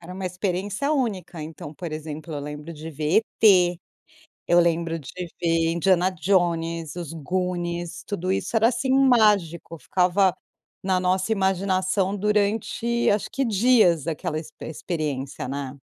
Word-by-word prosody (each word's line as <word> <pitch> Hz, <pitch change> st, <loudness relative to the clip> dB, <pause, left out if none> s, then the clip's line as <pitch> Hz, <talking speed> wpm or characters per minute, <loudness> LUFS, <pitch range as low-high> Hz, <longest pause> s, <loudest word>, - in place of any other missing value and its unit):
Era 180 Hz, +2 st, -10 dB
uma 190 Hz, 0 st, -4 dB
experiência 195 Hz, -, -2 dB
única. 200 Hz, -, -2 dB
Então, 155 Hz, -1 st, -8 dB
por 170 Hz, +1 st, -7 dB
exemplo, 155 Hz, +1 st, -6 dB
eu 145 Hz, -, -3 dB
lembro 150 Hz, +3 st, -7 dB
de 160 Hz, +1 st, -8 dB
ver 155 Hz, +5 st, +2 dB, 0.2 s
E.T. 180 Hz, -4 st, +5 dB, 0.7 s
Eu 175 Hz, 0 st, +5 dB
lembro 170 Hz, -1 st, +1 dB
de 140 Hz, -, -11 dB, 0.3 s
ver 165 Hz, -1 st, +2 dB
Indiana 180 Hz, +2 st, +3 dB
Jones, 170 Hz, -2 st, 0 dB
os 170 Hz, -3 st, -6 dB
Goonies, 175 Hz, +1 st, -3 dB
tudo 185 Hz, -2 st, -2 dB
isso 210 Hz, -, -2 dB
era 225 Hz, +1 st, +5 dB
assim 255 Hz, +2 st, -1 dB
mágico. 210 Hz, -11 st, +3 dB
Ficava 180 Hz, +2 st, +2 dB, 0.5 s
na 190 Hz, -1 st, +1 dB
nossa 185 Hz, +3 st, 0 dB
imaginação 190 Hz, 0 st, +1 dB
durante 210 Hz, +3 st, 0 dB
acho 205 Hz, 0 st, 0 dB
que 275 Hz, -, 0 dB
dias 215 Hz, -, +4 dB
daquela 155 Hz, -1 st, -3 dB
expe 160 Hz, -, -11 dB
experiência, 150 Hz, -6 st, -4 dB
né. 140 Hz, 0 st, -5 dB
180 Hz, 140 wpm, -24 LUFS, 165-200 Hz, 0.7 s, E.T